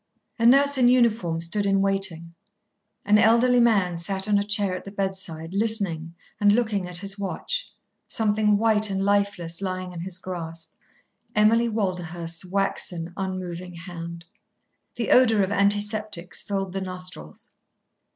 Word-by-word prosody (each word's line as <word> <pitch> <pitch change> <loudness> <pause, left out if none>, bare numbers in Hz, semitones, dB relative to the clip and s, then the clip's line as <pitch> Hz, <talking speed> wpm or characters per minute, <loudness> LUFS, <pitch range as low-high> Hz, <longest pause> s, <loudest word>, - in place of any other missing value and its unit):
A 230 - +4
nurse 280 +2 +5
in 245 - +5
uniform 230 -9 +2
stood 200 +5 0
in 195 0 +2
waiting; 195 -4 -1 0.7
an 210 +1 +5
elderly 235 +3 +4
man 200 -7 +3
sat 190 +3 -3
on 205 -1 +3
a - - 0
chair 205 -2 +1
at - - -7
the - - -8
bedside, 190 -4 -4
listening 195 -6 -1 0.2
and 205 -1 +5
looking 210 -4 0
at 180 -1 +3
his 195 +2 -3
watch, - - -3 0.4
something 210 -1 +2
white 215 -1 +2
and 195 0 -1
lifeless 200 -4 0
lying 185 -1 -4
in 170 - -7
his 180 +1 -4
grasp, 165 -3 -7 0.6
Emily 225 +3 +4
Walderhurst's 175 -5 -3
waxen, 180 -3 -2
unmoving 185 -2 -5
hand. 170 -1 -8 0.7
The 235 -2 -2
odour 225 -5 +5
of 190 - -2
antiseptics 205 -2 0
filled 195 -2 -3
the 195 - -3
nostrils. 180 - -6
195 Hz, 140 wpm, -24 LUFS, 175-210 Hz, 0.7 s, nurse